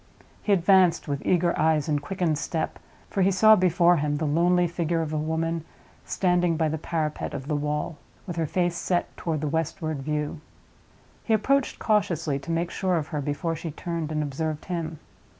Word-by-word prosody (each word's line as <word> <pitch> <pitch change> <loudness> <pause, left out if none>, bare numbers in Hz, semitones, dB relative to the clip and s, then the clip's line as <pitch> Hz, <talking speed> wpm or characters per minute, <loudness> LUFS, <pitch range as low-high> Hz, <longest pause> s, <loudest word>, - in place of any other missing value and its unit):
He 210 - -1
advanced 185 -3 +4
with 140 -1 -3
eager 175 -1 +2
eyes 155 -1 +2
and 150 -2 0
quickened 160 -1 -1
step; 160 +1 -3 0.3
for 195 - 0
he 190 - +5
saw 215 +3 +6
before 175 -2 +4
him 145 0 0
the 155 - -1
lonely 175 +4 +3
figure 170 -1 -1
of 155 -1 -4
a - - 0
woman, 160 +1 -1 0.4
standing 175 -3 +1
by 160 -1 +1
the 160 +1 -3
parapet 155 -1 -2
of 135 - -6
the 150 - 0
wall, 150 +1 -2 0.3
with 175 -4 -5
her 165 -2 0
face 175 +1 0
set 175 0 -1
toward 160 -3 -2
the 155 - -1
westward 155 0 -2
view. 150 +1 -3 0.8
He 225 - +3
approached 275 +5 +1
cautiously, 170 -9 +1
to 140 - -11
make 165 +1 -1
sure 185 -3 0
of 155 -1 -3
her 150 -3 -2
before 150 +4 -2
she 165 +1 -5
turned 165 0 -4
and 155 -1 0
observed 150 +2 -3
him. 165 -3 -3
165 Hz, 185 wpm, -26 LUFS, 150-175 Hz, 0.8 s, saw